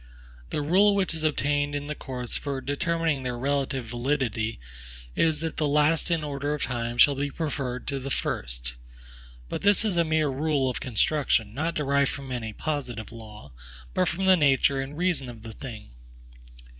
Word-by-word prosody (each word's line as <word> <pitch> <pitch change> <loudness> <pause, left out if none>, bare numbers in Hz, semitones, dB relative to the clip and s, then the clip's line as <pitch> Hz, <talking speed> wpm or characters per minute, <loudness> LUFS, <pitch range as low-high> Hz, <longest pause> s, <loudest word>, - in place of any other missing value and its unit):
The 150 - -1
rule 195 +7 +5
which 195 -3 +2
has 160 - -2
obtained 145 -1 +1
in 145 0 -3
the 150 - -3
courts 125 -5 -4
for 140 -2 -2
determining 160 +1 0
their 125 -1 -3
relative 135 -1 -1
validity 120 -2 -1 0.6
is, 160 -2 +2
that 165 -1 -3
the 150 - +1
last 150 +3 +3
in 165 -2 +1
order 145 0 -2
of 150 - -3
time 120 -1 -2
shall 140 +3 +7
be 140 +1 -2
preferred 135 -5 -3
to 140 - -2
the 135 +1 -5
first. - - -2 0.7
But - - -4
this 205 +2 +4
is 195 -5 0
a 170 - +5
mere 160 -2 +2
rule 140 -1 +1
of - - -4
construction, 125 -2 +1
not 160 +6 -1
derived 140 -1 +2
from 135 -2 -6
any 115 -3 -3
positive 120 -5 -4
law, 105 - -11 0.4
but - - +2
from 190 +3 -1
the 190 0 +7
nature 140 -3 +3
and 140 +2 -6
reason 170 -7 0
of 115 -2 -10
the 115 -1 -8
thing. 110 - -9
140 Hz, 180 wpm, -27 LUFS, 125-155 Hz, 0.7 s, shall